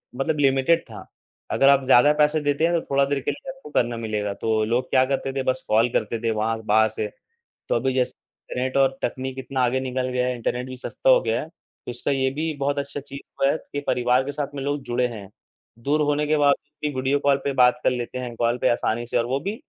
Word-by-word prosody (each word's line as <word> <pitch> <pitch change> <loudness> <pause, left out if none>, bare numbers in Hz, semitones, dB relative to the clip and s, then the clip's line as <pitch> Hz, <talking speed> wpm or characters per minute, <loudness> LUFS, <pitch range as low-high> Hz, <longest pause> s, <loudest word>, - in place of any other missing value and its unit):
मतलब 150 +3 -1
लिमिटेड 135 +4 +3
था। - - -10 0.5
अगर 135 - +4
आप 140 -1 +4
ज़्यादा 135 +3 +6
पैसे 150 +1 +3
देते 145 +3 +2
है 170 - 0
तो 165 - +2
थोड़ा 140 0 +4
देर 140 0 -1
के 135 - -2
लिए 280 -2 -9
आपको 265 - -13
करना 120 -4 0
मिलेगा। 105 -3 -2
तो 110 +1 0
लोग 120 +3 -1
क्या 130 0 +4
करते 135 0 -2
थे, 135 -1 -2
बस 130 0 -1
कॉल 115 +3 +3
करते 115 -1 -1
थे 115 - +1
वहाँ 110 +1 -1
बाहर 110 +1 +4
से। 110 0 -3 0.6
तो - - +2
अभी 130 -1 0
जैसे 130 -1 +1 0.4
इंटरनेट 130 +2 -1
और 135 -1 +3
तकनीक 130 +1 -3
इतना 130 0 -3
आगे 130 +2 0
निकल 130 0 -2
गए 125 0 -1
है, 125 0 -1
इंटरनेट 125 +2 -3
भी 130 0 -8
सस्ता - - -2
हो - - +6
गया - - -1
है - - -7
तो - - -13
इसका 120 +3 -3
ये 130 -1 +1
भी 155 +3 -2
बहुत 140 +1 0
अच्छा 145 0 -5
चीज़ 140 0 -10 0.2
हुआ 135 +1 +4
है - - -1 0.2
कि 145 - -1
परिवार 125 +1 +2
के 145 - -3
साथ 145 0 -3
में 135 - -4
लोग 145 0 -2
जुड़े 125 +1 0
है। 105 -5 -9 0.5
दूर 150 +3 +1
होने 145 0 +1
के 155 0 +2
बावजूद 145 +1 0
भी 145 - -3
वीडियो 135 +2 +1
कॉल 140 -1 +3
पे 140 - +1
बात 125 -1 +4
कर - - +4
लेते 125 0 -4
है 120 -2 -6
कॉल 120 +1 +1
पे - - +2
आसानी 120 0 0
से - - 0
और 115 - +1
वो 130 +3 -1
भी 200 +5 -3
130 Hz, 250 wpm, -23 LUFS, 120-145 Hz, 0.6 s, ज़्यादा